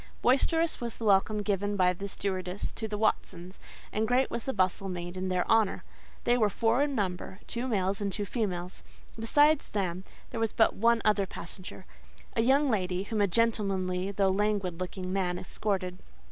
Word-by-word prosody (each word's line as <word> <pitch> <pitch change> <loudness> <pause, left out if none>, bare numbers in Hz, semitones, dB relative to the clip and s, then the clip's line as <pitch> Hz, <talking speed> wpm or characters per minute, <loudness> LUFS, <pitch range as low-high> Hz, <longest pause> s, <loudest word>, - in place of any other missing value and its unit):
Boisterous 325 +6 +2
was 235 -2 -3
the 230 - -6
welcome 205 +1 +3
given 205 0 0
by 180 -2 +3
the 195 +3 -6
stewardess 190 -1 -3
to 220 - -5
the 210 -1 -3
"Watsons," 185 -3 -1 0.3
and 220 +1 +1
great 250 +3 +2
was 235 - -4
the 265 - 0
bustle 190 -2 0
made 175 0 -5
in 185 0 -3
their 180 -1 0
honour. 225 -3 +2 0.4
They 240 +1 +3
were 215 -2 +4
four 230 +5 +2
in 285 -1 0
number, 190 -2 -3
two 245 +2 -3
males 195 -3 0
and 200 -1 -1
two 205 +1 -3
females. 185 -5 -3 0.4
Besides 290 +6 +4
them, 185 -3 -2 0.3
there 230 - -4
was 225 -2 0
but 225 - +4
one 230 +1 +2
other 210 -2 +3
passenger—a 185 +5 -7
young 275 +5 +4
lady, 185 -3 0
whom 215 +1 -1
a 200 - +4
gentlemanly, 195 -3 0
though 195 -1 +2
languid 195 -3 0
looking 185 0 -4
man 180 -2 0
escorted. 185 -1 -2
200 Hz, 175 wpm, -29 LUFS, 185-225 Hz, 0.4 s, were